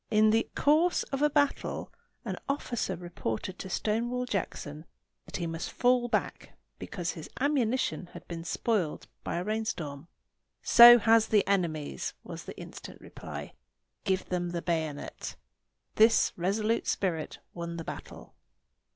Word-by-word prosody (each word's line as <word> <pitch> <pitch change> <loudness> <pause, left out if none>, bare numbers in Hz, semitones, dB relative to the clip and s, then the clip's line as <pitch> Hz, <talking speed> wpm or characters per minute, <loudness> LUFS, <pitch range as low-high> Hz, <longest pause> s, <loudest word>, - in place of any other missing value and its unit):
In 215 0 +5
the 225 +1 +2
course 315 +5 +3
of 275 - -1
a 295 - +5
battle 285 -1 0 0.3
an - - -2
officer 275 -4 -1
reported 175 -1 -4
to 190 - -6
Stonewall 235 +6 -1
Jackson 155 -8 -4 0.4
that - - -5
he 175 - -2
must 165 0 -4
fall 245 0 +3
back 240 - -2 0.2
because 175 -3 -3
his 160 - -9
ammunition 260 -8 +1
had - - -11
been 165 -1 -6
spoiled 175 0 -1 0.2
by - - -3
a 175 - -1
rainstorm. 175 -9 -3 0.6
"So 240 0 +10
has 225 0 +4
the 210 -3 +3
enemy's," 160 - -1
was - - -8
the - - -9
instant - - -10
reply. - - -8 0.5
"Give 190 -1 0
them 175 -1 -1
the 170 -1 -4
bayonet." 160 -4 -3 0.6
This 225 +1 +5
resolute 210 +6 0
spirit 165 -5 -1 0.2
won 170 -1 -5
the 165 - -4
battle. - - -9
195 Hz, 140 wpm, -29 LUFS, 170-235 Hz, 0.6 s, So